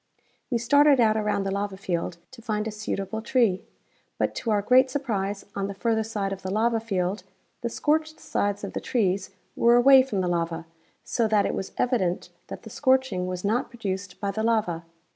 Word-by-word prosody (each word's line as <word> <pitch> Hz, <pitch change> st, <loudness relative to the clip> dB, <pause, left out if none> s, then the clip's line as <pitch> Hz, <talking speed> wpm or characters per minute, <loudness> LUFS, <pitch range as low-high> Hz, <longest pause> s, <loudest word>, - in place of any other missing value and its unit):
We 245 Hz, -, +1 dB
started 285 Hz, +4 st, +5 dB
out 220 Hz, -2 st, +4 dB
around 210 Hz, -2 st, 0 dB
the 195 Hz, -, -2 dB
lava 200 Hz, 0 st, -2 dB
field 175 Hz, -3 st, -3 dB
to 255 Hz, -3 st, -13 dB
find 215 Hz, -2 st, -2 dB
a -, -, -3 dB
suitable 210 Hz, 0 st, -4 dB
tree, 225 Hz, -5 st, +2 dB, 0.5 s
but -, -, 0 dB
to 235 Hz, -, -4 dB
our 205 Hz, -2 st, +2 dB
great 260 Hz, +4 st, +5 dB
surprise 210 Hz, -8 st, -2 dB
on 195 Hz, 0 st, -1 dB
the 200 Hz, -, -6 dB
further 225 Hz, +1 st, +1 dB
side 205 Hz, -3 st, -3 dB
of 190 Hz, -, -8 dB
the 190 Hz, -, -5 dB
lava 225 Hz, +3 st, +1 dB
field 195 Hz, -3 st, -2 dB, 0.4 s
the 235 Hz, -, -2 dB
scorched 310 Hz, +5 st, 0 dB
sides 205 Hz, -11 st, -1 dB
of 200 Hz, -, -5 dB
the -, -, -3 dB
trees 195 Hz, -5 st, 0 dB, 0.3 s
were 235 Hz, +1 st, +5 dB
away 265 Hz, +2 st, +8 dB
from 220 Hz, -7 st, -2 dB
the 180 Hz, -, -1 dB
lava, 170 Hz, -1 st, -1 dB, 0.4 s
so 230 Hz, -2 st, 0 dB
that 210 Hz, -2 st, +3 dB
it -, -, -1 dB
was 190 Hz, -, -4 dB
evident 200 Hz, -9 st, 0 dB, 0.2 s
that -, -, -8 dB
the -, -, -9 dB
scorching 260 Hz, -9 st, +1 dB
was 180 Hz, +1 st, -4 dB
not 235 Hz, +6 st, 0 dB
produced 195 Hz, -5 st, -5 dB
by 200 Hz, -1 st, -1 dB
the 220 Hz, +2 st, -3 dB
lava. 210 Hz, -7 st, 0 dB
210 Hz, 200 wpm, -26 LUFS, 195-240 Hz, 0.5 s, away